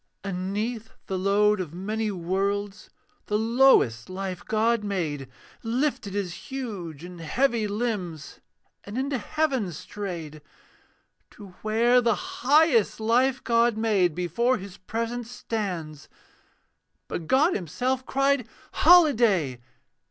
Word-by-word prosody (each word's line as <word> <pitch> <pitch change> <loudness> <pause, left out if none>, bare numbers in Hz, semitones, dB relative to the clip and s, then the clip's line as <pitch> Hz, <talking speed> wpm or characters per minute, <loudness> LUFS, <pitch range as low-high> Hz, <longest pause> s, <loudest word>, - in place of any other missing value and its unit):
And 185 -1 -3
'neath 225 +2 -3
the 190 - -3
load 200 +2 +2
of 165 -2 -7
many 215 +4 -2
worlds, 195 +2 -2 0.4
The 210 - +1
lowest 225 - +3
life 185 -1 -5
God 225 +1 +1
made 155 -10 -3 0.3
Lifted 230 -4 -1
his 190 -4 -4
huge 200 - -6
and 175 -1 -9
heavy 230 - +1
limbs 200 -8 -4 0.4
And 205 +4 -7
into 270 0 -1
heaven 265 - -1
strayed. 165 -3 -7 0.9
To 205 -2 -13
where 235 +3 +3
the 230 -2 +2
highest 270 - +2
life 250 +4 +2
God 235 -1 +2
made 200 -7 +2
Before 235 +9 +1
His 190 -1 -9
presence 230 +4 -4
stands; 180 -11 -5 1.0
But 165 - -5
God 295 +7 +4
himself 250 - -2
cried, 275 -2 +1 0.2
'Holiday!' 230 - +4
210 Hz, 115 wpm, -26 LUFS, 185-240 Hz, 1.0 s, God